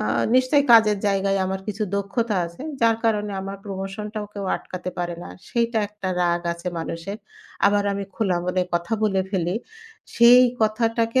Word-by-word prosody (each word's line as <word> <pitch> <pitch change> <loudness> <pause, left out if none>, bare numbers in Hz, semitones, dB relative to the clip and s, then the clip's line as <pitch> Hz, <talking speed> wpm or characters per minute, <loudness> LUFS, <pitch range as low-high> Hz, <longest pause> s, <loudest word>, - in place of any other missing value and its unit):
আ - - -1 0.3
নিশ্চয়ই 260 +3 +4
কাজের 215 -3 +6
জায়গায় 195 0 +1
আমার 190 0 -3
কিছু 210 +1 -3
দক্ষতা 200 +2 -1
আছে 170 +10 -11 0.2
যার 230 -1 +4
কারণে 210 -2 +1
আমার 195 +1 -6
promotion-টাও 205 +2 -5
কেউ 200 -1 -4
আটকাতে 185 0 -7
পারে 175 -1 -2
না। - - -9 0.2
সেইটা 235 -1 0
একটা 205 -2 -6
রাগ 175 0 +1
আছে 170 +1 -5
মানুষের। 165 +5 -5 0.5
আবার 205 0 +2
আমি 200 0 -3
খোলা 195 -6 0
মনে 180 0 0
কথা 170 +5 -2
বলে 195 -3 +2
ফেলি। 180 0 -1 0.6
সেই 240 +1 +8 0.2
কথাটাকে 230 +2 +1
200 Hz, 160 wpm, -23 LUFS, 190-225 Hz, 0.6 s, সেই